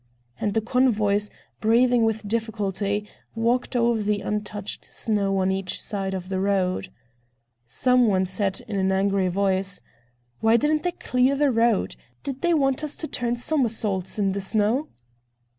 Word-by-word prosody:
And 205 0 -1
the 220 - +3
convoys, 215 -4 +2 0.3
breathing 240 +2 +4
with 220 -1 0
difficulty, 210 -2 -2 0.3
walked 240 +3 0
over 235 -2 +2
the 205 0 0
untouched 210 -1 -4
snow 200 -3 -1
on 190 0 +2
each 190 -1 -2
side 195 -2 -3
of 185 -1 -5
the 190 -1 -1
road. 185 - 0 0.8
Some 250 - +3
one 190 -2 +2
said 190 +1 -2
in 200 - -3
an 190 0 +1
angry 195 0 +1
voice: 195 +1 0 0.6
"Why 225 +1 +4
didn't 300 +4 +1
they 355 +1 -1
clear 255 -1 +1
the 285 -1 +2
road? 230 -3 +2 0.3
Did 270 -1 -5
they 345 -1 +3
want 270 -1 +1
us 300 -1 -3
to 315 - -4
turn 240 -4 -1
somersaults 225 - 0
in 200 -2 +1
the 200 +1 -3
snow?" 215 +8 +1
210 Hz, 155 wpm, -24 LUFS, 195-245 Hz, 0.8 s, breathing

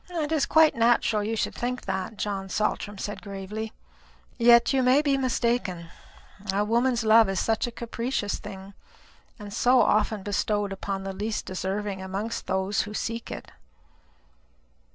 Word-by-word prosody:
"It 320 -4 -2
is 310 -3 +2
quite 315 -1 +5
natural 230 -2 +3
that 205 - -3
you 225 - -1
should - - -1
think 250 +1 -3
that," 190 +3 -3
John 195 -1 -3
Saltram 205 0 -1
said 205 +2 -5
gravely. 205 +2 -6 0.7
"Yet 235 +2 +6
you 265 - +3
may 255 +4 +4
be 280 -2 +2
mistaken. 235 -9 -1 0.6
A 200 +2 +1
woman's 235 +2 +1
love 220 -1 +6
is 195 - -1
such 225 +1 0
a - - -5
capricious 235 -2 -3
thing, 190 +1 -9 0.6
and 205 -2 -9
so 245 +3 +4
often 210 -2 +2
bestowed 205 0 -1
upon 195 0 -4
the 195 0 -4
least 210 +3 -3
deserving 190 +1 -3
amongst 195 +4 -4
those 190 +3 0
who 210 0 -6
seek 230 +1 -3
it." - - -8
215 Hz, 155 wpm, -26 LUFS, 195-235 Hz, 0.7 s, Yet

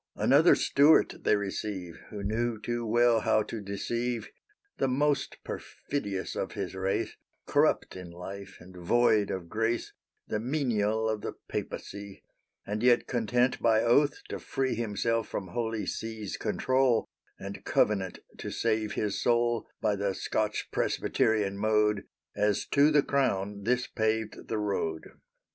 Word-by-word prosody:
Another 150 +6 +5
Stuart 145 +3 +5
they - - +3
receive, 95 -3 -4
Who 105 -2 -6
knew 110 +2 -1
too 120 +1 -3
well 120 +1 +4
how 110 0 +2
to 110 +1 -6
deceive; 115 +3 -3 0.5
The - - +2
most 140 +2 +1
perfidious 100 -10 -4
of - - -3
his - - -4
race, 95 +1 -1 0.3
Corrupt - - +2
in 90 -2 -8
life, 95 +3 -8
and 90 +1 -14
void 105 +3 +3
of 90 -3 -4
grace, 115 +5 -1 0.3
The 105 - -1
menial 110 -4 0
of 110 -1 -1
the - - -4
Papacy; 100 -1 -6 0.4
And 105 +1 -3
yet 120 -1 +4
content 125 +1 +1
by 110 -1 +4
oath 140 +5 +3
to - - -4
free 135 -1 -1
Himself 115 0 -1
from 95 -2 -5
Holy 115 +2 -2
See's 110 -2 -4
control, 130 +2 +1 0.3
And - - -7
covenant 95 -3 +1 0.2
to - - -4
save 110 -2 0
his 105 -2 -1
soul 120 -1 +2
By 105 - +2
the 100 -1 -1
Scotch 105 -1 -1
Presbyterian 100 -3 +1
mode, 105 -1 +2 0.3
As 105 -1 +1
to 145 +1 +5
the 150 -2 +4
crown 100 -7 0
this 125 +1 +2
paved 110 -1 -2
the 110 - -2
road. 95 -6 -2
110 Hz, 140 wpm, -29 LUFS, 100-120 Hz, 0.5 s, Another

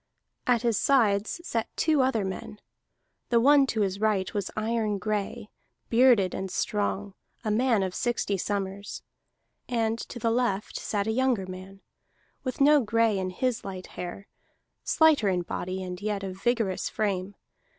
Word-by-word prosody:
At 245 -2 +3
his 230 -4 +2
sides 220 -3 +2
sat 230 -9 -2
two 310 -3 +3
other 235 -6 +1
men: 190 +2 -6 0.7
the 235 - +4
one 280 +2 +6
to 220 -4 -1
his 195 -1 0
right 210 -3 +1
was 200 -2 -2
iron 215 -1 0
gray, 210 +1 -3 0.4
bearded 230 -6 +5
and 190 0 -4
strong, 205 0 -2 0.3
a 215 - +1
man 225 -2 +2
of 185 -1 -3
sixty 240 -4 -1
summers; 200 +1 -4 0.7
and 230 -2 0
to - - -7
the 230 -1 0
left 225 -4 0
sat 205 -2 -1
a 220 - 0
younger 245 -4 +1
man, 185 +1 -10 0.6
with 255 -2 -4
no 290 +1 +6
gray 225 -2 +2
in 185 0 -2
his 245 +6 -1
light 185 -2 -6
hair, 180 +2 -7 0.6
slighter 310 -10 +4
in 180 -2 0
body, 185 +2 -4
and 180 0 -6
yet 205 -1 -2
of 190 0 -6
vigorous 230 -6 0
frame. 200 -2 -2
210 Hz, 155 wpm, -27 LUFS, 195-235 Hz, 0.7 s, one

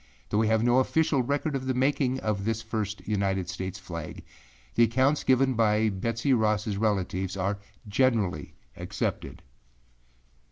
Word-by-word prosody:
Though 105 - +1
we 110 - +3
have 110 0 +2
no 120 +2 +4
official 145 +1 +2
record 140 +3 -1
of 130 -1 -3
the 130 - 0
making 130 0 +1
of 105 -2 -1
this 115 +1 -1
first 105 -4 -4
United 95 -3 0
States 95 +1 -4
flag, 85 -4 -7 0.5
the - - +2
accounts 130 +6 +2
given 130 0 +3
by 110 -1 +2
Betsey 115 +7 -1
Rossâ 105 -3 +1
relatives 95 -3 -1
are 100 +2 -1 0.3
generally 105 - 0 0.2
accepted. - - -4
110 Hz, 145 wpm, -27 LUFS, 100-130 Hz, 0.5 s, no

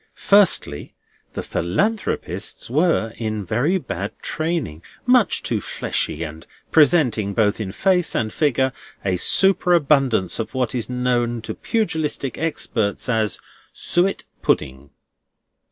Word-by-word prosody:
Firstly, 200 -1 +2 0.4
the - - -4
Philanthropists 200 - -2
were 150 -7 +2
in 110 -3 -3
very 130 - +1
bad 185 - -5
training: 155 - -2 0.2
much 250 -3 +3
too - - -1
fleshy, 80 - -2
and 80 0 -8 0.2
presenting, 130 - +3
both 105 -2 +2
in 95 -3 -4
face 180 - +1
and 110 -1 -1
figure, 130 -3 +1 0.3
a 95 -2 +1
superabundance 145 - +3
of 115 - -4
what 125 -2 0
is 120 -2 -3
known 125 -1 0
to - - -4
Pugilistic 160 - -1
Experts 115 -11 -1
as 110 -4 0 0.3
Suet 180 +3 0 0.2
Pudding. 70 -1 -1
125 Hz, 115 wpm, -21 LUFS, 110-170 Hz, 0.4 s, much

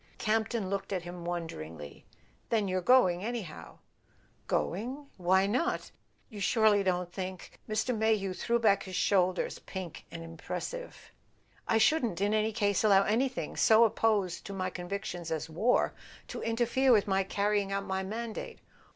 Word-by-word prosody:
Campton 220 -1 0
looked 200 +1 -3
at 185 -3 -2
him 175 0 -8
wonderingly. 80 - -6 0.4
"Then 215 -3 +1
you're 185 0 0
going 185 -5 +4
anyhow? 220 -8 -6 0.3
" - - -36
"Going? 250 +10 -4
Why 190 +1 +3
not? 260 - -1 0.4
You 210 - -10
surely 215 0 +4
don't 180 -2 -1
think 185 -1 -6
?" - - -23
Mr. 220 +3 0
Mayhew 215 -3 +1
threw 235 +5 0
back 205 -4 +3
his 185 -2 -7
shoulders, 185 -2 +1
pink 185 -4 -7
and 165 - -7
im¬ 165 0 -12
pressive. - - -5 0.7
"I 225 - +3
shouldn't, 235 - +2
in 205 +2 +1
any 215 0 +2
case, 205 -3 +1
allow 200 -2 +6
anything 250 +5 -1
so 220 +1 +6
opposed 215 -5 +1
to 200 - -6
my 185 -1 -2
convictions 180 -2 -5
as 160 0 -3
war 220 +10 +2 0.4
to - - -5
interfere 240 +3 +2
with 215 -4 +5
my 195 -1 +2
carrying 200 0 0
out 195 0 -1
my 190 0 -2
mandate. 220 +3 -5
200 Hz, 160 wpm, -30 LUFS, 185-225 Hz, 0.7 s, allow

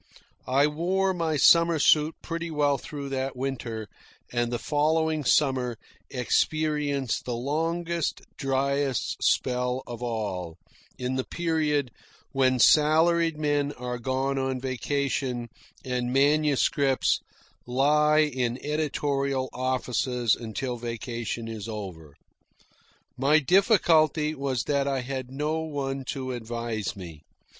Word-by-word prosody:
I 135 +3 +4
wore 185 +6 0
my 165 -3 -1
summer 170 +3 +6
suit 150 +2 +4
pretty 170 0 -4
well 145 -3 +1
through 140 0 -7
that 135 0 -2
winter, 120 -4 -4 0.4
and 120 -1 0
the 120 - 0
following 155 +2 +1
summer 130 -3 +2 0.3
experienced 145 0 0
the 125 - -2
longest, 165 +6 -1
dryest 135 -1 -1
spell 125 0 +1
of 120 -1 -8
all, 100 -8 -3 0.4
in 130 +1 -2
the 130 - 0
period 150 -6 0 0.4
when 130 -1 +2
salaried 160 +4 +4
men 145 -1 0
are 125 0 -5
gone 135 +2 -1
on 130 -1 -1
vacation 130 -1 -2 0.4
and 125 -1 -1
manuscripts 140 -1 +2 0.5
lie 150 +4 +4
in 130 -5 0
editorial 140 -3 -1
offices 125 -2 0
until 120 +2 -4
vacation 115 -1 -4
is 110 -1 -6
over. 90 -9 -7 1.0
My 140 +4 +4
difficulty 160 - +3
was 135 -4 -2
that 140 -1 0
I 135 -2 0
had 130 0 -5
no 150 +4 -2
one 140 -4 -3
to 130 -1 -4
advise 115 -3 -4
me. 85 -6 -9
135 Hz, 115 wpm, -26 LUFS, 125-150 Hz, 1.0 s, summer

